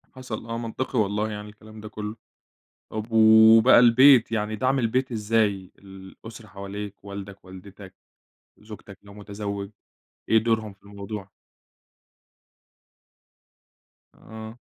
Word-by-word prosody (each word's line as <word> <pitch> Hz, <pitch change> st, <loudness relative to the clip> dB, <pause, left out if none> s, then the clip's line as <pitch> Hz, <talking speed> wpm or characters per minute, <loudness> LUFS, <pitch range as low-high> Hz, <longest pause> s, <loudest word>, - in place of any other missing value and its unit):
حصل 125 Hz, -4 st, -7 dB
آه، 115 Hz, 0 st, -5 dB
منطقي 120 Hz, +2 st, -4 dB
والله 105 Hz, +1 st, -1 dB
يعني 105 Hz, 0 st, -8 dB
الكلام 110 Hz, +1 st, -15 dB
ده 105 Hz, -, -9 dB
كلّه. 105 Hz, 0 st, -7 dB, 0.8 s
طب 110 Hz, +1 st, -6 dB
وبقى 110 Hz, +2 st, +6 dB
البيت، 125 Hz, 0 st, +6 dB
يعني 110 Hz, 0 st, -2 dB
دعم 130 Hz, +4 st, 0 dB
البيت 130 Hz, +2 st, -1 dB
إزاي 105 Hz, -3 st, -1 dB
الأسرة 100 Hz, +3 st, -13 dB
حواليك، 100 Hz, +1 st, -9 dB
والدك، 100 Hz, 0 st, -10 dB
والدتك، 95 Hz, +1 st, -13 dB, 0.6 s
زوجتك 105 Hz, -2 st, -13 dB
لو 100 Hz, 0 st, -15 dB
متزوج، 100 Hz, -1 st, -7 dB, 0.6 s
إيه 110 Hz, -, +4 dB
دورهم 110 Hz, -2 st, -1 dB
في 100 Hz, -, -33 dB
الموضوع؟ 100 Hz, 0 st, -9 dB, 2.8 s
آه. 110 Hz, +1 st, -11 dB
110 Hz, 110 wpm, -24 LUFS, 100-115 Hz, 2.8 s, وبقى